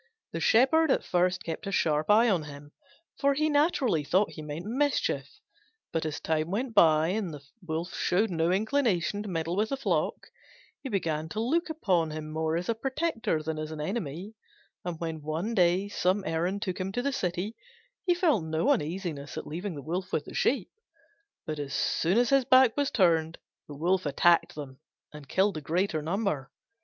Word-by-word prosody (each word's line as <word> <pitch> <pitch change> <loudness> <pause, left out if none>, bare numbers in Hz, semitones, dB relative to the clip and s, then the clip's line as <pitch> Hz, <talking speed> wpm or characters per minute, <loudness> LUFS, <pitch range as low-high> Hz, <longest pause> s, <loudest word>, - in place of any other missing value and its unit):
The - - -3
Shepherd 285 +7 +4
at - - +2
first 180 0 +1
kept 165 +5 -5
a - - -2
sharp 155 -4 +1
eye 220 +3 +6
on 180 -8 +1
him, 145 0 -11 0.5
for 280 0 +3
he 310 +2 +1
naturally 285 - +2
thought 190 +8 +2
he 155 - -8
meant 155 +3 -6
mischief: 270 +6 0 0.7
but 160 -1 0
as 150 - -4
time 155 0 -1
went 230 +5 -2
by 160 -5 +5
and 195 -2 -1
the 145 -2 -9 0.2
Wolf 170 +1 -4
showed 195 +4 +1
no 165 0 +1
inclination 205 - +1
to 210 - -6
meddle 165 -1 -2
with 215 +3 +1
the 275 - -2
flock, 185 - 0 0.7
he 270 - -5
began 160 -7 -1
to 215 - -4
look 320 +10 0
upon 185 - +1
him 155 0 -6
more 160 +1 -1
as 175 - -4
a 230 - +2
protector 260 - -1
than 155 0 -3
as 155 0 -4
an 155 -1 -7
enemy: 185 +2 -4 0.5
and 175 -2 -4
when 160 -2 -4
one 160 +9 -3
day 180 0 +3
some 195 0 0
errand 180 +5 -1
took 185 0 -3
him 185 +1 -2
to 245 - -1
the 280 0 0
city, 185 -2 -2 0.5
he 355 - +4
felt 315 - +2
no 160 +1 0
uneasiness 155 -3 -2
at - - -5
leaving 175 +3 -5
the 140 - -7
Wolf 180 +4 -3
with 150 - -1
the - - -10
sheep. 245 -8 0 0.7
But 155 -1 -4
as 140 -1 -4
soon 175 +6 +1
as 245 +1 +3
his 275 -2 +4
back 255 -2 +6
was 285 -1 +1
turned 165 -5 +2 0.3
the 145 - -9
Wolf 180 +2 +1
attacked 170 +4 +3
them 135 -3 -8 0.3
and 150 -2 -11
killed 195 +2 +2
the - - -5
greater 165 +2 0
number. 160 -5 -2
180 Hz, 190 wpm, -28 LUFS, 160-220 Hz, 0.7 s, eye